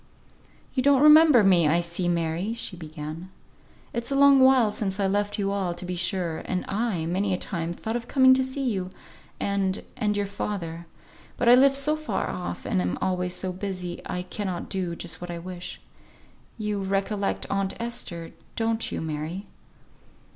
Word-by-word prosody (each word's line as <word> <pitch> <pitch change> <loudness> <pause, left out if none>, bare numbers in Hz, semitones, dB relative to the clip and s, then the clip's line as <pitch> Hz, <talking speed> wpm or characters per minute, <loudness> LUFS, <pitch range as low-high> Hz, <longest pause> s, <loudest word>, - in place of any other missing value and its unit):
"You 260 - +1
don't 280 +1 +4
remember 300 -5 +8
me 180 -5 +5
I 165 +3 +3
see, 170 +1 -3
Mary!" 170 +4 -1
she 220 -4 -4
began. 160 +1 -7 0.6
"It's 235 0 -3
a 275 - 0
long 280 0 +7
while 260 -4 +5
since 205 -2 -3
I 200 - +2
left 205 +1 0
you 200 -1 0
all, 190 -3 -1
to 175 +1 -7
be 180 0 -3
sure; 175 -2 -1
and 180 -1 -2
I, 200 -5 -1
many 185 +3 0
a - - -3
time, 170 -3 -3
thought 220 +6 -4
of 240 0 -4
coming 260 -1 +6
to 260 0 +3
see 260 +1 -3
you, 190 -6 -1 0.5
and 195 -1 0
and 210 -4 0
your 205 - 0
father. 170 -4 -5 0.5
But 240 - +3
I - - +9
live 270 +2 +6
so 290 +3 +3
far 310 -1 -2
off, 175 - -5
and 90 - +1
am 90 0 -1
always 180 -1 -1
so 185 -1 -2
busy, 180 -2 -5
I 180 - -4
cannot 185 -1 -4
do 180 -3 -2
just 170 0 -5
what 175 - -6
I 170 - -4
wish. 180 +1 -7 0.8
You 210 -2 -2
recollect 195 +1 -1
aunt 195 -1 -1
Esther, 230 -8 -4 0.2
don't 225 0 -1
you, - - -3
Mary?" 160 +5 -4
195 Hz, 180 wpm, -26 LUFS, 175-230 Hz, 0.8 s, I